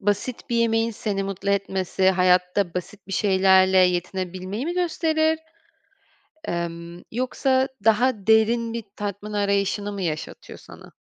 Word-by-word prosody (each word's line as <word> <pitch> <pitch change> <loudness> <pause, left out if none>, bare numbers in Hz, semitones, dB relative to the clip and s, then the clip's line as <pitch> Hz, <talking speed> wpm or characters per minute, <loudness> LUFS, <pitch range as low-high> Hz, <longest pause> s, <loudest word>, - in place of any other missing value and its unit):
basit 205 +5 -2
bir 235 - +1
yemeğin 230 0 +2
seni 205 -2 -3
mutlu 195 0 -3
etmesi 190 -1 +1
hayatta 180 0 +2
basit 195 +3 -6
bir - - -6
şeylerle 190 -1 +4
yetinebilmeyi 185 - -1
mi 350 - -2
gösterir, 320 -2 +1 1.1
emm, 170 0 -5
yoksa 260 +2 +1 0.2
daha 225 -1 +2
derin 225 +1 +3
bir 230 -1 -4
tatmin 205 +1 -5
arayışını 200 0 0
mı 200 - -5
yaşatıyor 155 -4 -5
sana? - - -14
200 Hz, 125 wpm, -23 LUFS, 185-230 Hz, 1.1 s, şeylerle